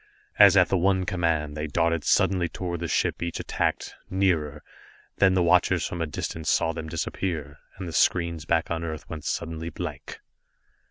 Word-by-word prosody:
As 100 Hz, -2 st, +8 dB
at 90 Hz, -, +5 dB
the 95 Hz, -, +2 dB
one 95 Hz, +1 st, +2 dB
command, 80 Hz, -5 st, -1 dB
they 75 Hz, 0 st, -3 dB
darted 85 Hz, +1 st, 0 dB
suddenly 95 Hz, -3 st, +2 dB
toward 85 Hz, 0 st, -4 dB
the 85 Hz, -, -3 dB
ship -, -, 0 dB
each 85 Hz, -1 st, -3 dB
attacked -, -, -2 dB, 0.2 s
nearer 80 Hz, -6 st, 0 dB, 0.5 s
then 95 Hz, -1 st, +4 dB
the 90 Hz, -, +3 dB
watchers 85 Hz, 0 st, +3 dB
from 85 Hz, -, -4 dB
a 80 Hz, -, -1 dB
distance 80 Hz, +1 st, -4 dB
saw 80 Hz, -, +2 dB
them 80 Hz, -1 st, -6 dB
disappear, 80 Hz, -2 st, -4 dB, 0.2 s
and 95 Hz, -1 st, -6 dB
the 85 Hz, -, -6 dB
screens 85 Hz, -3 st, +1 dB
back 85 Hz, 0 st, 0 dB
on 85 Hz, 0 st, -2 dB
Earth 80 Hz, -2 st, -6 dB
went 80 Hz, -2 st, -7 dB
suddenly 80 Hz, 0 st, -3 dB
blank. 75 Hz, -4 st, -7 dB
85 Hz, 175 wpm, -26 LUFS, 80-90 Hz, 0.5 s, As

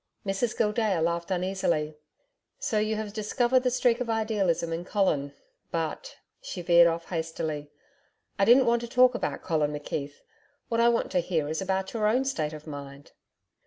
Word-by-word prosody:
Mrs 195 Hz, +4 st, -1 dB
Gildea 210 Hz, -4 st, +1 dB
laughed 170 Hz, +2 st, -1 dB
uneasily. 180 Hz, -5 st, -1 dB, 0.6 s
'So 215 Hz, -, 0 dB
you 215 Hz, +1 st, 0 dB
have 215 Hz, -1 st, -5 dB
discovered 240 Hz, +4 st, +2 dB
the 250 Hz, 0 st, +1 dB
streak 245 Hz, -1 st, +2 dB
of 240 Hz, -, -2 dB
idealism 205 Hz, -7 st, 0 dB
in 165 Hz, +1 st, -3 dB
Colin. 175 Hz, -8 st, 0 dB, 0.4 s
But' -, -, -4 dB, 0.2 s
she 180 Hz, -, -6 dB
veered 170 Hz, 0 st, +6 dB
off 165 Hz, 0 st, -2 dB
hastily, 160 Hz, -3 st, -3 dB, 0.7 s
'I 195 Hz, -, +4 dB
didn't 250 Hz, +4 st, +6 dB
want 235 Hz, 0 st, +2 dB
to 235 Hz, -, -5 dB
talk 250 Hz, +1 st, +5 dB
about 240 Hz, -, -3 dB
Colin 155 Hz, -4 st, 0 dB
McKeith. 145 Hz, -1 st, -5 dB, 0.5 s
What 230 Hz, -1 st, +1 dB
I 235 Hz, -, +6 dB
want 235 Hz, -, +1 dB
is -, -, -12 dB
to 180 Hz, -, +2 dB
hear 165 Hz, -4 st, -1 dB
about 190 Hz, 0 st, -2 dB
your 215 Hz, -2 st, +1 dB
own 250 Hz, +5 st, +2 dB
state 160 Hz, -, -2 dB
of 155 Hz, -1 st, -9 dB
mind.' 140 Hz, -2 st, -9 dB
190 Hz, 170 wpm, -27 LUFS, 160-230 Hz, 0.7 s, veered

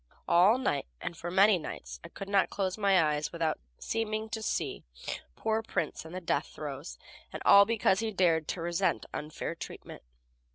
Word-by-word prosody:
All 185 Hz, +7 st, +6 dB
night 145 Hz, -, -1 dB
and, 170 Hz, -, -5 dB
for 170 Hz, +1 st, -5 dB
many 195 Hz, +1 st, +5 dB
nights, 155 Hz, -, -7 dB
I 170 Hz, -, -9 dB
could 195 Hz, +3 st, -8 dB
not 200 Hz, -1 st, +3 dB
close 190 Hz, -2 st, -1 dB
my 200 Hz, -3 st, +4 dB
eyes 150 Hz, -2 st, +1 dB
without 165 Hz, -2 st, -1 dB, 0.2 s
seeming 220 Hz, -1 st, -2 dB
to 220 Hz, 0 st, -4 dB
see -, -, -2 dB, 0.5 s
poor 220 Hz, 0 st, 0 dB
Prince 225 Hz, -, -3 dB
in 160 Hz, -, -9 dB
the 185 Hz, -, -4 dB
death 175 Hz, -, -1 dB
throes, 145 Hz, +1 st, -7 dB, 0.3 s
and -, -, -5 dB
all 200 Hz, 0 st, +9 dB
because 210 Hz, -3 st, +2 dB
he 225 Hz, 0 st, -1 dB
dared 170 Hz, -5 st, +2 dB
to 175 Hz, -, -3 dB
resent 175 Hz, +3 st, 0 dB
unfair 150 Hz, +2 st, -4 dB
treatment. 165 Hz, -, -9 dB
185 Hz, 175 wpm, -30 LUFS, 165-210 Hz, 0.5 s, all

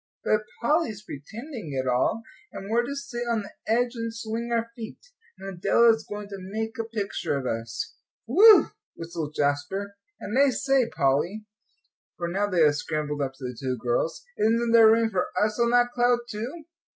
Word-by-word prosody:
But 215 Hz, 0 st, +2 dB, 0.2 s
Polly's 235 Hz, -, +1 dB
pretending 215 Hz, -, -8 dB
it 130 Hz, -, -2 dB
all; 130 Hz, -, +1 dB, 0.3 s
and 195 Hz, +2 st, -7 dB
we're 235 Hz, +1 st, +4 dB
to 280 Hz, -, -4 dB
sit 280 Hz, -4 st, -5 dB
on 225 Hz, -3 st, 0 dB
the 200 Hz, -, -11 dB, 0.2 s
edge 240 Hz, +2 st, +2 dB
and 230 Hz, -1 st, -4 dB
swing 225 Hz, +1 st, -4 dB
our 230 Hz, 0 st, 0 dB
feet. 225 Hz, -2 st, -8 dB, 0.4 s
And 195 Hz, -, -9 dB
Adela 195 Hz, +5 st, +4 dB
is 220 Hz, -, -5 dB
going 205 Hz, 0 st, -6 dB
to 200 Hz, -, -6 dB
make 220 Hz, +5 st, -5 dB
a 225 Hz, -, -1 dB
picture 210 Hz, -9 st, -2 dB
of 135 Hz, -, -5 dB
us." 115 Hz, -1 st, -4 dB, 0.3 s
"Whew!" 430 Hz, +2 st, +7 dB, 0.2 s
whistled 165 Hz, -2 st, -6 dB
Jasper. 190 Hz, +8 st, -1 dB, 0.2 s
"And 225 Hz, +6 st, -1 dB
I 280 Hz, 0 st, +6 dB
say, 265 Hz, -2 st, +1 dB
Polly," 160 Hz, +11 st, 0 dB, 0.7 s
for 170 Hz, -, -3 dB
now 195 Hz, +4 st, 0 dB
they 180 Hz, -4 st, +2 dB
had 150 Hz, -1 st, +5 dB
scrambled 150 Hz, -1 st, -3 dB
up 135 Hz, -1 st, -2 dB
to 135 Hz, -, -14 dB
the 125 Hz, -1 st, -4 dB
two 130 Hz, +1 st, -3 dB
girls, 120 Hz, -, -1 dB
"isn't 230 Hz, +2 st, +2 dB
there 225 Hz, -1 st, +8 dB
room 225 Hz, 0 st, +3 dB
for 185 Hz, -2 st, 0 dB
us 210 Hz, +2 st, 0 dB
on 235 Hz, 0 st, +3 dB
that 245 Hz, 0 st, +3 dB
cloud 245 Hz, 0 st, +3 dB
too?" 240 Hz, +10 st, -6 dB
215 Hz, 185 wpm, -26 LUFS, 165-235 Hz, 0.7 s, there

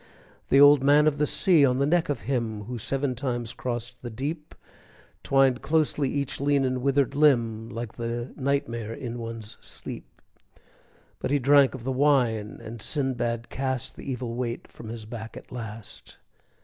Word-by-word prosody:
The 135 Hz, -, +5 dB
Old 145 Hz, -1 st, +8 dB
Man 145 Hz, +2 st, +5 dB
of 150 Hz, -1 st, +2 dB
the 150 Hz, -, +3 dB
Sea, 170 Hz, -2 st, +4 dB
on 125 Hz, -2 st, +3 dB
the 140 Hz, -, +2 dB
neck 165 Hz, +2 st, +2 dB
of 140 Hz, -6 st, -1 dB
him 115 Hz, -5 st, -2 dB
Who 120 Hz, +3 st, -6 dB
seven 135 Hz, +3 st, -1 dB
times 120 Hz, -2 st, -3 dB
crossed 120 Hz, 0 st, -5 dB
the 120 Hz, -, -6 dB
deep, 150 Hz, +7 st, -5 dB, 0.7 s
Twined 135 Hz, -2 st, +3 dB
closely 150 Hz, -1 st, +1 dB
each 140 Hz, -1 st, -2 dB
lean 140 Hz, -1 st, +2 dB
and 130 Hz, -1 st, -1 dB
withered 140 Hz, 0 st, +2 dB
limb, 120 Hz, -7 st, +2 dB
Like 115 Hz, -1 st, -6 dB
the 120 Hz, +1 st, -4 dB
nightmare 130 Hz, -5 st, -2 dB
in 120 Hz, -3 st, -6 dB
one's 115 Hz, -2 st, -7 dB
sleep. -, -, -7 dB, 1.1 s
But -, -, -2 dB
he 145 Hz, -, +3 dB
drank 140 Hz, 0 st, +5 dB
of 125 Hz, -, -9 dB
the 130 Hz, -, -1 dB
wine, 125 Hz, -6 st, +2 dB
and 115 Hz, 0 st, -8 dB
Sindbad 120 Hz, -4 st, -2 dB
cast 130 Hz, -2 st, -3 dB
The 140 Hz, -, -6 dB
evil 125 Hz, -2 st, -4 dB
weight 120 Hz, -1 st, -4 dB
from 110 Hz, -, -11 dB
his 115 Hz, -1 st, -7 dB
back 110 Hz, 0 st, -8 dB
at -, -, -12 dB
last. 115 Hz, -3 st, -9 dB
130 Hz, 170 wpm, -26 LUFS, 115-140 Hz, 1.1 s, Old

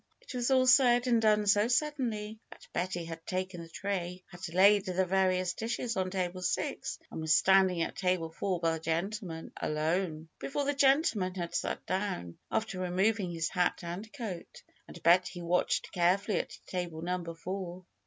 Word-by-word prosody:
'' -, -, -48 dB
It -, -, -10 dB
was 245 Hz, 0 st, 0 dB
all 260 Hz, -1 st, +4 dB
said 250 Hz, -1 st, +6 dB
and 235 Hz, -2 st, +3 dB
done 210 Hz, -1 st, +3 dB
so 205 Hz, +2 st, +4 dB
suddenly 235 Hz, -6 st, -1 dB
that -, -, -14 dB
Betty 175 Hz, -1 st, -2 dB
had 165 Hz, 0 st, -8 dB
taken 185 Hz, -1 st, -3 dB
the 165 Hz, -, -10 dB
tray, 180 Hz, 0 st, -3 dB
had 180 Hz, 0 st, -7 dB
laid 200 Hz, +3 st, +5 dB
the 185 Hz, 0 st, +1 dB
various 185 Hz, -1 st, +2 dB
dishes 230 Hz, +2 st, -3 dB
on 185 Hz, -1 st, 0 dB
table 185 Hz, -1 st, -2 dB
six 180 Hz, -, -2 dB
and -, -, -5 dB
was 160 Hz, 0 st, +3 dB
standing 190 Hz, -3 st, +4 dB
at -, -, -5 dB
table 180 Hz, -3 st, 0 dB
four 185 Hz, +2 st, -2 dB
by 165 Hz, -1 st, +2 dB
the 160 Hz, -, -3 dB
gentleman 165 Hz, +1 st, -3 dB
^^alone" 160 Hz, +1 st, -1 dB
before 285 Hz, +1 st, -2 dB
the 285 Hz, -, +1 dB
gentleman 270 Hz, -, +3 dB
had 175 Hz, -2 st, -4 dB
sat -, -, -2 dB
down, 185 Hz, -, -3 dB
after 220 Hz, -4 st, -1 dB
removing 190 Hz, +2 st, +1 dB
his 165 Hz, -1 st, -2 dB
hat 180 Hz, -2 st, +1 dB
and 180 Hz, +6 st, -6 dB
coat. 215 Hz, -11 st, -7 dB, 0.2 s
And 170 Hz, -, -12 dB
Betty 175 Hz, +1 st, +4 dB
watched 175 Hz, +1 st, +1 dB
carefully 185 Hz, +2 st, +2 dB
at -, -, -5 dB
table 175 Hz, -3 st, -4 dB
number 175 Hz, -1 st, -3 dB
four. 185 Hz, +1 st, -6 dB
185 Hz, 175 wpm, -31 LUFS, 175-210 Hz, 0.2 s, said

